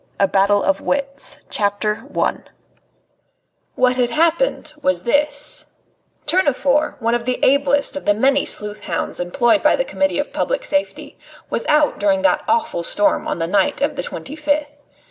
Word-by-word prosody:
XI -, -, -37 dB
A 195 Hz, -, +5 dB
BATTLE 200 Hz, +1 st, +2 dB
OF 195 Hz, 0 st, +1 dB
WITS 275 Hz, 0 st, -2 dB, 2.4 s
What 255 Hz, 0 st, +2 dB
had 245 Hz, -1 st, +2 dB
happened 330 Hz, -, +1 dB
was 185 Hz, -7 st, +1 dB
this: 285 Hz, +4 st, 0 dB, 0.6 s
Tournefort, 290 Hz, -4 st, +1 dB
one 230 Hz, +1 st, 0 dB
of 240 Hz, -1 st, -1 dB
the 250 Hz, 0 st, -1 dB
ablest 280 Hz, +1 st, +2 dB
of 285 Hz, -, -6 dB
the 205 Hz, -, +3 dB
many 275 Hz, +5 st, +2 dB
sleuth 210 Hz, 0 st, -2 dB
hounds -, -, -3 dB
employed 240 Hz, -, +2 dB
by -, -, +4 dB
the -, -, -1 dB
Committee 290 Hz, -12 st, -1 dB
of 290 Hz, -, -3 dB
Public -, -, -1 dB
Safety, 290 Hz, 0 st, -3 dB, 0.3 s
was -, -, -2 dB
out 300 Hz, 0 st, +2 dB
during 290 Hz, -2 st, +1 dB
that 295 Hz, -, +3 dB
awful 305 Hz, -, 0 dB
storm 205 Hz, +4 st, +1 dB
on -, -, -2 dB
the 165 Hz, -, -1 dB
night 205 Hz, -, +1 dB
of 285 Hz, +1 st, 0 dB
the 275 Hz, -, -2 dB
twenty 280 Hz, -, -6 dB
fifth. 295 Hz, -1 st, -1 dB
280 Hz, 160 wpm, -19 LUFS, 235-295 Hz, 2.4 s, A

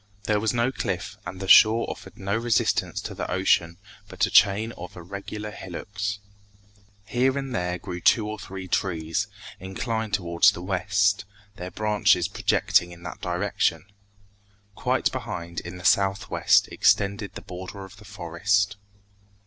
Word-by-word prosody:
There 105 Hz, +1 st, +1 dB
was 110 Hz, +1 st, +1 dB
no 120 Hz, +1 st, +1 dB
cliff, -, -, -3 dB
and 95 Hz, +1 st, -7 dB
the 95 Hz, -, -5 dB
shore 110 Hz, +4 st, +7 dB
offered -, -, -8 dB
no 100 Hz, +2 st, -2 dB
resistance 115 Hz, 0 st, +1 dB
to -, -, -6 dB
the -, -, -5 dB
ocean 85 Hz, -3 st, +2 dB, 0.3 s
but -, -, 0 dB
a -, -, -5 dB
chain 105 Hz, +3 st, +4 dB
of 90 Hz, -, -10 dB
irregular 100 Hz, +4 st, -7 dB
hillocks. 100 Hz, +2 st, -5 dB, 0.9 s
Here 130 Hz, +6 st, +1 dB
and 135 Hz, -2 st, -4 dB
there 90 Hz, -4 st, -1 dB
grew 90 Hz, 0 st, -7 dB
two 110 Hz, +3 st, +4 dB
or 110 Hz, 0 st, -5 dB
three 95 Hz, -1 st, -7 dB
trees, 90 Hz, +1 st, -1 dB, 0.3 s
inclined 110 Hz, +3 st, -2 dB
towards 85 Hz, +1 st, +3 dB
the 90 Hz, -, -8 dB
west, 100 Hz, +3 st, +1 dB, 0.3 s
their 90 Hz, +1 st, -6 dB
branches 105 Hz, 0 st, +2 dB
projecting 90 Hz, -, +1 dB
in 85 Hz, 0 st, -13 dB
that 85 Hz, -, -8 dB
direction. 90 Hz, +1 st, 0 dB, 0.9 s
Quite -, -, 0 dB
behind, 85 Hz, 0 st, -5 dB
in 85 Hz, +1 st, -8 dB
the 90 Hz, -, -10 dB
southwest, 95 Hz, +1 st, +3 dB
extended 100 Hz, 0 st, +1 dB
the -, -, -7 dB
border 95 Hz, +2 st, -8 dB
of 95 Hz, +1 st, -15 dB
the 105 Hz, -, -15 dB
forest. 100 Hz, +2 st, 0 dB
100 Hz, 150 wpm, -25 LUFS, 90-105 Hz, 0.9 s, shore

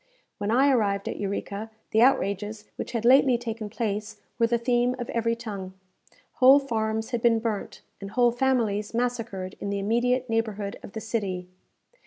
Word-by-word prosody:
When 205 Hz, 0 st, -2 dB
I 265 Hz, +5 st, +4 dB
arrived 200 Hz, -5 st, +1 dB
at -, -, -3 dB
Eureka, 200 Hz, +1 st, -4 dB, 0.2 s
the 220 Hz, -, +4 dB
outrages 210 Hz, -4 st, +1 dB
which -, -, -6 dB
had 230 Hz, -1 st, -2 dB
lately 260 Hz, 0 st, +6 dB
taken 225 Hz, -2 st, -5 dB
place 210 Hz, -1 st, -3 dB, 0.2 s
were 230 Hz, -, +4 dB
the 235 Hz, +1 st, +2 dB
theme 245 Hz, +1 st, +1 dB
of 245 Hz, -2 st, -5 dB
every 230 Hz, 0 st, 0 dB
tongue. 200 Hz, -5 st, -7 dB, 0.6 s
Whole 265 Hz, 0 st, +8 dB
farms 220 Hz, -4 st, -2 dB
had 240 Hz, -2 st, -1 dB
been 235 Hz, -1 st, +4 dB
burnt, 220 Hz, -2 st, -4 dB, 0.2 s
and 195 Hz, -, -7 dB
whole 240 Hz, +3 st, +3 dB
families 235 Hz, -5 st, 0 dB
massacred 230 Hz, -6 st, -2 dB
in 200 Hz, -, -4 dB
the 200 Hz, -, -1 dB
immediate 245 Hz, +5 st, +1 dB
neighbourhood 215 Hz, -3 st, -2 dB
of -, -, -11 dB
the 220 Hz, -, -5 dB
city. 195 Hz, -6 st, -3 dB
225 Hz, 170 wpm, -26 LUFS, 205-240 Hz, 0.6 s, Whole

